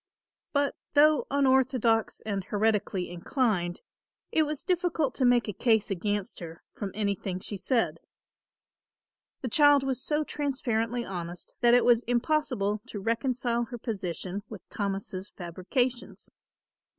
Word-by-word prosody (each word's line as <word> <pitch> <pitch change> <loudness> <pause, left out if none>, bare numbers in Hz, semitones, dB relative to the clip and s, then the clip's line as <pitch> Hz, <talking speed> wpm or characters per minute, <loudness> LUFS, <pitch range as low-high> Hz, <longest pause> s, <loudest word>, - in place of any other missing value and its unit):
But 285 -1 +1 0.2
though 300 0 +5
unorthodox 260 -5 +2
and 200 -3 -2
heretically 205 -4 0
inclined, 175 -1 -1 0.5
it 315 -1 +3
was 300 -2 -4
difficult 345 -7 0
to 260 - +1
make 245 -1 +4
a 210 - -3
case 220 +1 +2
against 205 +1 -2
her 165 -1 -9
from 200 - -4
anything 200 -3 -2
she 205 - -4
said. 235 +4 0 1.4
The 255 - -3
child 290 +2 +5
was 265 -1 -1
so 300 0 0
transparently 245 -5 -1
honest 175 -2 -6
that 240 0 +6
it 245 - +4
was 240 -1 +5
impossible 240 -5 0
to 210 - -6
reconcile 235 +2 0
her 240 +1 -7
position 195 -3 -4
with 205 -6 -10
Thomas' 195 -1 -3
fabrications. 195 +8 -3
230 Hz, 125 wpm, -28 LUFS, 200-265 Hz, 1.4 s, that